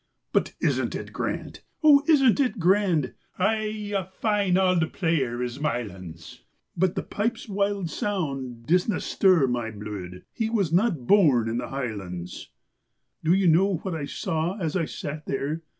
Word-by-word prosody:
"But - - +1
isn't - - 0
it - - -6
grand? - - -4 0.2
O, 285 -2 +7
isn't 275 -6 +5
it 255 -3 +1
grand?" 180 -5 +2 0.2
"Ay, 215 +1 -1
a 195 - +1
fine 195 0 0
auld 185 -4 +2
player 135 -9 0
is 125 +2 -4
Mylands, 95 - -5 0.4
But 180 +1 +1
the - - -2
pipes' 230 +3 -3
wild 200 -3 -1
sound 135 - -3
disna 180 +5 +2
stir 185 -7 +3
my 120 -3 -1
bluid" 100 -4 -7
He 225 -1 -1
was 200 -8 0
not 175 - +2
born 140 - +4
in 115 +1 -1
the - - -4
highlands. 95 -10 -5 0.7
Do 160 - +2
you 190 -1 +3
know 185 +4 +4
what 190 - -3
I 155 -3 -3
saw 165 +4 -2
as 165 -5 -2
I 170 -4 +1
sat 150 0 -6
there? 145 +4 -2
165 Hz, 155 wpm, -25 LUFS, 125-200 Hz, 0.7 s, O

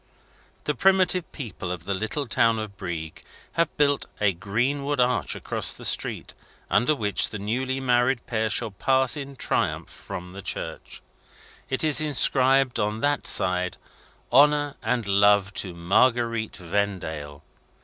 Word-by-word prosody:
The 150 - -1
primitive 185 +2 +2
people 105 - -6
of 85 -2 -6
the 100 - -1
little 110 +9 -3
town 115 0 +2
of 110 -2 -6
Brieg 85 -5 -6 0.3
have 170 -2 -1
built 145 -1 +2
a 105 -2 +2
greenwood 125 +10 -2
arch 125 0 +1
across - - +1
the - - -6
street, - - 0 0.4
under 155 +5 +3
which 105 -5 0
the 110 - -6
newly 130 +6 -2
married 125 -1 +1
pair 110 -2 -1
shall 110 - -2
pass 130 +6 +1
in 140 -2 -7
triumph - - -1
from 90 0 -8
the 100 - -8
church. - - -6 0.7
It 130 - 0
is 155 -1 +3
inscribed, 135 -3 +3
on 105 +2 -1
that 145 0 0
side, 90 0 +2 0.5
"HONOUR 145 +2 +4
AND 125 -3 -1
LOVE 100 0 +3
TO 90 -4 -1
MARGUERITE 115 +5 +1
VENDALE!" 80 -6 -4
115 Hz, 140 wpm, -25 LUFS, 100-135 Hz, 0.7 s, HONOUR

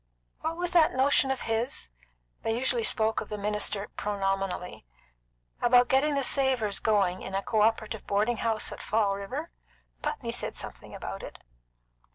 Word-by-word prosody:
"What 325 +1 -3
was 355 0 -1
that 330 -6 +4
notion 270 +1 +3
of 265 -1 -1
his" 225 - -2 0.5
they 225 0 -1
usually 250 -1 +1
spoke 220 0 +2
of - - -8
the 210 - -4
minister 210 0 0
pronominally 195 - -2 0.8
"about 245 0 +5
getting 285 +3 +3
the 275 - +1
Savors 255 -7 +2
going 195 -4 +2
in 190 - -5
a 195 - -1
co 215 +1 +1
operative 220 0 0
boarding 215 +4 +1
house 225 -1 +1
at - - -7
Fall 205 -2 +1
River? 260 +12 -5 0.5
Putney 240 - -3
said - - -2
something - - -7
about - - -6
it." - - -9
225 Hz, 160 wpm, -28 LUFS, 205-265 Hz, 0.8 s, about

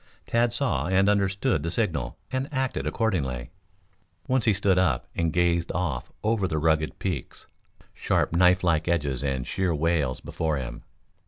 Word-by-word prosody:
Tad 120 0 +2
saw - - 0
and 95 +2 +3
understood 100 -5 +1
the 85 - -2
signal 80 - -2
and 130 +1 -2
acted 130 -2 -1
accordingly. 70 - -1 0.8
Once 130 -2 +1
he 110 - +4
stood 95 -1 +2
up 80 -10 +1
and 85 -1 0
gazed 85 0 +1
off 80 -8 -2
over 110 -3 +1
the 80 - -2
rugged 80 -2 +1
peaks, 85 -10 -4 0.5
sharp - - 0
knife 90 +1 +4
like 80 -2 +2
edges 75 -6 0
and 65 -2 -1
sheer 95 +1 0
wails 75 -4 0
before 80 -2 -2
him. - - -6
85 Hz, 155 wpm, -26 LUFS, 75-100 Hz, 0.8 s, he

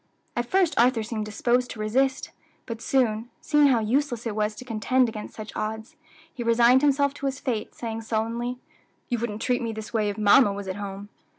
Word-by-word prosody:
At 240 0 -1
first 370 -1 +2
Arthur 240 -1 +4
seemed 215 -1 -4
disposed 245 +4 +1
to 220 - -8
resist; 265 +6 0 0.3
but 230 -2 -6
soon, 230 -2 +1
seeing 295 -2 +4
how 260 -3 +4
useless 240 +1 0
it 220 -3 -3
was 210 0 0
to 255 - -10
contend 250 +2 +2
against 215 -2 -7
such 215 -1 -8
odds, 220 +7 -4 0.4
he 245 - -7
resigned 235 +2 +5
himself 280 -1 +3
to 280 - -4
his 270 -1 -3
fate, 230 -5 -3
saying 225 -1 -4
sullenly, 230 +2 -2 0.5
"You 240 -2 0
wouldn't 220 -2 -3
treat 250 -1 +1
me 230 -1 -3
this 220 +1 -8
way 215 -2 +1
if 205 - -5
mamma 210 +1 +5
was 200 -1 -6
at 190 +1 -4
home." 200 0 -6
230 Hz, 200 wpm, -25 LUFS, 215-255 Hz, 0.5 s, resigned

